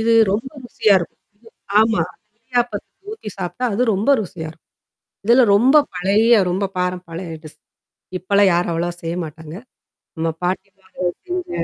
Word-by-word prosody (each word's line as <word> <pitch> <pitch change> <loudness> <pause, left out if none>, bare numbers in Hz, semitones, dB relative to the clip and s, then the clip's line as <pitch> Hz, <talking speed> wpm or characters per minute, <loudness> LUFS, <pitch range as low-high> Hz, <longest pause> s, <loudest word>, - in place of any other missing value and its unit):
இது 230 +1 +2 0.2
ரொம்ப 225 +6 -2
ருசியா 215 -3 +3
இருக்கும். 170 - -8 0.6
ஆமா. 220 -5 +3 0.4
இடியாப்பத்துக்கு 240 - -3
ஊத்தி 435 - -7
சாப்பி்ட்டா, 250 +8 -2
அது 235 - +1
ரொம்ப 205 +8 +1
ருசியா 170 -5 -6
இருக்கும். 160 0 -19 0.6
இதெல்லாம் 235 -1 +5
ரொம்ப 250 +8 +4 0.2
பழைய 205 +6 +4 0.2
ரொம்ப 190 +3 0
பாரம் 180 0 -2
பழைய 165 0 -6
டிஷ். 155 - -13 0.6
இப்பலாம் 200 +1 +3
யாரும் 175 0 +1
அவ்வளவா 170 +1 -1
செய்ய 165 +1 -3
மாட்டாங்க. 160 0 -10 0.6
ஆமா 165 0 0
பாட்டிமார்கள் 185 -1 -3
செஞ்ச 360 -1 -4
195 Hz, 140 wpm, -20 LUFS, 175-230 Hz, 0.6 s, இதெல்லாம்